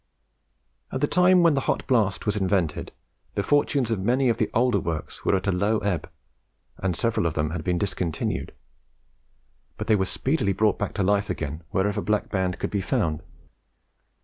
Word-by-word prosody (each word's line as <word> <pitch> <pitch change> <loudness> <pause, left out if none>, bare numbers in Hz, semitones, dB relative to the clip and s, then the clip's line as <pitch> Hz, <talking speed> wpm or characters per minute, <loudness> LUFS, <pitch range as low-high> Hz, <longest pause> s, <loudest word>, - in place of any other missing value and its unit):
At 130 - -2
the 145 - +3
time 180 +2 +4
when 165 -2 +5
the 140 - +1
hot - - 0
blast 110 -7 +1
was 105 -1 +1
invented, 95 -5 0 0.4
the 100 - 0
fortunes 140 -1 +2
of 110 - 0
many 125 +6 +2
of 115 - +1
the - - +1
older 125 +2 +2
works 80 -3 -5
were - - +3
at 95 - -2
a 100 - +2
low 100 +4 +1
ebb, 100 -5 -2 0.7
and 90 -2 -1
several 115 -5 0
of 80 - -3
them 75 0 0
had 80 -1 -4
been 90 -1 0
discontinued; 90 -4 -2 1.3
but - - -4
they 110 - +4
were 95 -2 +1
speedily 105 - 0
brought 105 +2 +2 0.2
to 100 - +1
life 100 +1 +1
again 75 +1 -4
wherever 105 +2 0
Black 105 0 0
Band 95 -2 -1
could - - -3
be 100 - 0
found. 90 - 0
100 Hz, 180 wpm, -25 LUFS, 90-115 Hz, 1.3 s, when